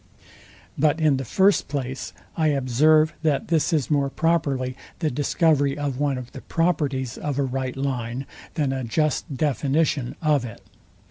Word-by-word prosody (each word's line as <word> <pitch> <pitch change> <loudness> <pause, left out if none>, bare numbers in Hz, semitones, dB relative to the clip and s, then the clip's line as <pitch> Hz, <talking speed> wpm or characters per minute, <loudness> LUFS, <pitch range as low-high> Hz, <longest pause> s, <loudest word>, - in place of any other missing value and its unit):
But 155 +2 +3
in 150 -4 +3
the 135 - -3
first 190 - +3
place 135 -2 -4 0.2
I 160 -1 +2
observe, 150 +3 +3
that 155 -4 0
this 165 +1 +2
is 155 -3 0
more 140 -2 +2
properly 140 -6 0 0.2
the 155 -3 -1
discovery 145 0 +2
of 140 -3 -3
one 145 -2 +1
of 125 -1 -8
the 135 - -9
properties 145 -7 -1
of 145 -2 -3
a 140 - +2
right 130 0 -3
line, 130 -1 -2 0.3
than 145 -4 0
a 130 -1 -3
just 150 +8 0
deflation 140 -1 0
of 150 -5 +2
it. 115 -4 -9
140 Hz, 155 wpm, -24 LUFS, 130-155 Hz, 0.3 s, But